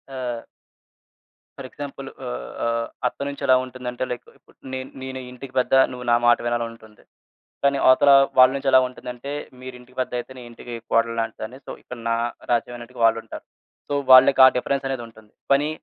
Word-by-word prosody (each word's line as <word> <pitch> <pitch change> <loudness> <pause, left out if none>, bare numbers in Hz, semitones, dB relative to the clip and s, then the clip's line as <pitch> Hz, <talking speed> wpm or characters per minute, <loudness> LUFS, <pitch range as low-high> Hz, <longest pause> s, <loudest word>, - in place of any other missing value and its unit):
ఆహ్ 120 -3 -4 1.2
ఫర్ 135 -2 -7
ఎగ్జాంపులు 135 -1 -8
ఆహ్, - - -6
ఆహ్, 115 0 -1 0.2
అత్త - - -7
నుంచెలా 140 -2 +2
ఉంటుందంటే, 125 -1 -6
లైక్ 125 0 -6
ఇప్పుడు - - -26 0.2
నేను 130 0 -5
నేనే 130 0 -6
ఇంటికి 130 +1 -11
పెద్ద 125 - -1 0.2
నువ్వు 125 -1 -8
నా - - +6
మాట 120 - +6
వినాలనంటుంది. 115 -2 -5 0.6
కానీ 140 0 +3
అవతలా 140 +2 +6 0.2
వాళ్ళ 130 0 +8
నుంచెలా 135 -1 +4
ఉంటుందంటే, 125 +2 -8 0.3
మీరింటికి 125 0 -12
పెద్దయితే 125 0 -4
నే - - -9
ఇంటికీ 120 0 -9 0.2
కోడలులాంటిదాన్ని. 115 +1 -1
సో, - - -8
ఇక్కడ 125 - -9
నా 115 - +2 0.3
రాజ్యం 120 +1 0
అన్నట్టుగా 120 0 -8
వాళ్ళుంటారు. 115 0 0 0.5
సో, 145 - 0 0.2
వాళ్ళకి 130 +1 +8
ఆ - - +9
డిఫరెన్సనేదుంటుంది. 120 -5 -4 0.2
పనీ 145 +2 +3
125 Hz, 150 wpm, -23 LUFS, 115-130 Hz, 1.2 s, ఆ